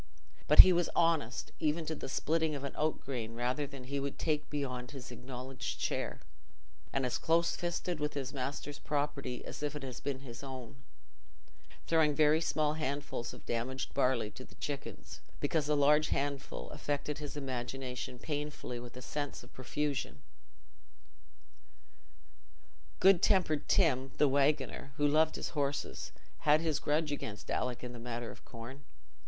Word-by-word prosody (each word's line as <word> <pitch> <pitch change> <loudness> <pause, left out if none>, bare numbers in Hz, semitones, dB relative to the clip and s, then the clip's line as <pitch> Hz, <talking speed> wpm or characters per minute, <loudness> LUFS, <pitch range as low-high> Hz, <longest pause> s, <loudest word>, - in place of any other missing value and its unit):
But - - +13
he 185 - +7
was 175 0 +2
honest 160 -8 +2
even 155 +2 +1
to 160 - -2
the 140 - -6
splitting 160 +2 +1
of 140 - -5
an 140 - -3
oat 155 +1 0
grain 115 -4 -4
rather 125 +4 0
than 135 -2 -9
he 140 +2 -2
would 140 0 -3
take 155 -2 0
beyond 125 -4 -3
his 130 -2 -8
acknowledged 125 +2 -5
share, - - -2 0.7
and 135 -1 0
as 125 - -1
"close 170 +1 +3
fisted" 175 -1 -2
with 150 0 -1
his 135 -2 -3
master's 140 +2 -4
property 145 -4 -2
as - - -7
if 150 0 -2
it 145 - -5
had 130 -2 -6
been 135 -2 -2
his 120 -3 -8
own—throwing 135 +4 -4
very 155 +1 +5
small 155 -2 +2
handfuls 140 -5 -2
of - - -12
damaged 125 +3 -2
barley 125 -5 +2
to 130 - -9
the - - -16
chickens, 140 -1 -6 0.2
because 150 0 +1
a 150 - +4
large 150 +2 +5
handful 140 0 -2
affected 145 0 -2
his 145 -1 -5
imagination 130 -1 -4
painfully 145 -3 -4
with 120 +1 -9
a 125 - -7
sense 145 -2 -4
of 120 - -16
profusion. 130 - -2 2.8
Good 190 -2 +7
tempered 175 -6 +3
Tim, 135 -7 +3
the 150 - +5
waggoner, 140 0 +1
who 145 - +4
loved 155 +2 +4
his - - -3
horses, 145 -2 -2 0.3
had 150 +1 +5
his 160 -3 0
grudge 150 +1 +1
against 110 -7 -5
Alick 125 -1 -1
in 125 0 -5
the 120 - -8
matter 120 0 -4
of - - -14
corn. 120 +4 -9
140 Hz, 160 wpm, -33 LUFS, 130-150 Hz, 2.8 s, But